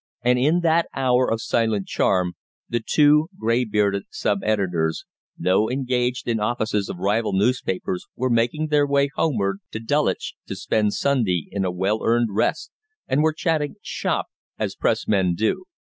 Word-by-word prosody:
And 125 +1 +3
in 155 +7 +3
that 170 0 +2
hour 130 -1 +2
of 115 0 -1
silent 110 -4 0
charm 90 -2 +1 0.3
the 120 0 -1
two 150 +3 +4
grey 115 +3 +1
bearded 100 -2 0
sub 100 -1 -1
editors, 90 -7 0 0.3
though 95 +4 +2
engaged 125 -1 -1
in 115 -2 0
offices 105 -2 -1
of - - -5
rival 105 +3 0
newspapers 95 -4 -1
were 130 0 -1
making 120 +7 +1
their 145 -1 +3
way 140 0 +2
homeward 100 -10 0
to 110 - -3
Dulwich 145 +7 0
to - - -5
spend 105 -2 0
Sunday 115 - +1
in 100 -1 -1
a 90 - 0
well 95 +5 -1
earned 115 0 +2
rest, 110 - -1 0.4
and 135 +3 +2
were 160 +1 +3
chatting 155 -2 -1
"shop," - - -2 0.3
as - - -2
Press - - 0
men 95 -4 +2
do. 110 - -1
115 Hz, 160 wpm, -23 LUFS, 100-135 Hz, 0.4 s, two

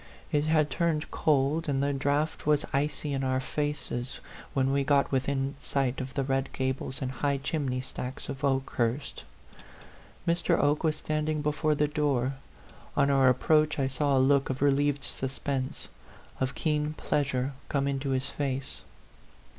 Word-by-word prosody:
It 145 0 +2
had 155 -1 +3
turned 165 -3 0
cold, 150 +2 +2
and 135 -1 +1
the 140 0 +1
draught 145 +3 0
was 150 -1 +3
icy 145 +1 0
in 135 0 -1
our 130 0 +1
faces 140 -3 -3 0.4
when 135 0 +2
we 140 0 +2
got 140 0 +3
within 135 +1 0
sight 135 -2 -1
of 130 +1 -7
the 135 - +1
red 135 0 0
gables 130 0 -2
and 130 - -2
high 140 +2 0
chimney 135 -2 -1
stacks 130 0 -5
of 135 +1 -6
Okehurst. 135 -1 0 1.0
Mr. 170 0 +2
Oke 145 +1 +2
was 155 -1 +2
standing 155 0 -1
before 150 +1 +1
the 150 0 +2
door. 140 -4 +1 0.6
On 140 0 +4
our 135 -2 +5
ap 125 0 +1
proach 155 -1 +4
I 135 - +1
saw 135 +1 +1
a 130 0 +4
look 140 -1 +3
of 130 +1 -1
relieved 145 0 +2
suspense, 130 0 -3 0.5
of 130 0 -1
keen 150 -1 0
pleasure, 135 -3 -1 0.2
come 140 -1 +1
into 140 0 -1
his 130 0 0
face. 135 -2 -3
140 Hz, 160 wpm, -29 LUFS, 135-150 Hz, 1.0 s, our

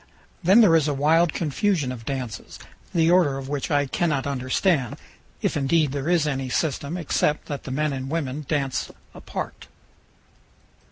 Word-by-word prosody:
Then 190 +6 +6
there 185 -7 +6
is 155 -2 +3
a 145 - 0
wild 160 +4 +3
confusion 155 -2 0
of 115 -3 -8
dances, 130 -4 -5 0.3
the 165 -1 +3
order 170 -7 +4
of 135 -1 -6
which 145 -2 -3
I 145 -2 +2
cannot 145 -1 0
understand, 135 - 0 0.5
if - - +1
indeed 145 +1 +2
there 140 +3 -3
is 175 -3 +3
any 135 -3 -2
system, 145 +3 -1
except 150 -2 0
that 145 -2 -6
the - - -5
men 150 +2 0
and 135 0 -4
women 150 -2 -3
dance 135 -4 -1 0.2
apart. - - -7
145 Hz, 160 wpm, -24 LUFS, 135-165 Hz, 0.5 s, Then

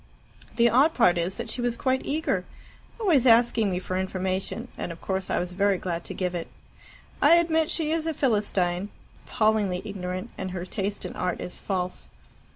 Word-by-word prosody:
"The 235 0 +5
odd 270 +8 +4
part 175 -8 +4
is 175 +3 -2
that - - -4
she 245 - -3
was 240 -1 0
quite 260 +1 +1
eager 310 +3 -1 0.6
always 320 - +3
asking 230 -2 +5
me 180 - -1
for 185 0 -3
information; 190 +5 -2
and - - -4
of 165 - -9
course 190 -1 -3
I - - +1
was 180 0 -1
very 200 +1 +2
glad 175 -2 -4
to - - -5
give 180 -1 -1
it. 170 -2 -4 0.7
I 335 - +7
admit 320 -2 +2
she 315 -2 0
is 325 0 0
a 320 - 0
Philistine, 205 -7 0 0.4
appallingly 215 -5 +1
ignorant, 185 +1 -5
and 190 - -3
her 180 -1 -5
taste 200 +1 -3
in - - -6
art 180 -1 -2
is 180 - -6
false. 180 -2 -3
200 Hz, 185 wpm, -26 LUFS, 180-245 Hz, 0.7 s, I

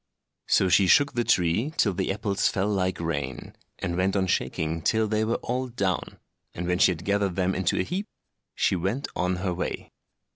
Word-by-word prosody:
So 95 - +3
she 90 +1 +4
shook 145 +9 +5
the 120 - 0
tree 105 - +1
till 100 - +3
the 90 - -1
apples 100 0 0
fell 95 +2 0
like 95 -3 0
rain, 70 -6 -4 0.2
and 85 -1 -3
went 95 +2 +1
on 95 -1 +2
shaking 80 0 -1
till 110 +6 +2
they 110 +1 0
were 115 +2 0
all 130 +2 -2
down, 100 -6 -2 0.4
and 85 - -4
when 90 0 0
she - - +6
had 90 -1 -4
gathered 100 -2 +1
them 95 0 +1
into 95 -2 0
a - - +2
heap, 190 - -4 0.5
she - - +2
went 100 +11 -2
on 90 +1 0
her 90 - 0
way. 85 - -4
95 Hz, 195 wpm, -26 LUFS, 90-110 Hz, 0.5 s, she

